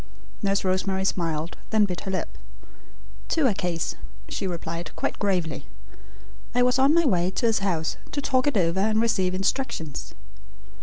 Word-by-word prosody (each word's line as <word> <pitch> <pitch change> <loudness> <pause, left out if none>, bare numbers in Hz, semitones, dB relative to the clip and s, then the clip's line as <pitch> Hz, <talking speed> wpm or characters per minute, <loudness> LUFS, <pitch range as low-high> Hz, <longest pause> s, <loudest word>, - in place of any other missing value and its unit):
Nurse 200 -1 +1
Rosemary 190 +1 +1
smiled, 165 -3 -1
then 215 -1 +4
bit 180 -3 -4
her 195 - -5
lip. 190 - -2 0.9
"To 320 -4 +2
a 240 - +4
case," 175 -3 -1 0.3
she 195 - -2
replied 170 -1 -4
quite - - -2
gravely. 180 -6 0 0.9
"I 245 - +5
was 250 +1 +3
on 275 +4 +5
my 335 -1 +4
way 180 -8 +3
to 190 - -1
his 225 -1 +3
house 170 -5 -1
to 290 - -2
talk 265 -1 +2
it 285 - +2
over 170 0 +2
and 215 +2 +2
receive 190 -5 +2
instructions." 195 - -2
190 Hz, 160 wpm, -26 LUFS, 175-230 Hz, 0.9 s, I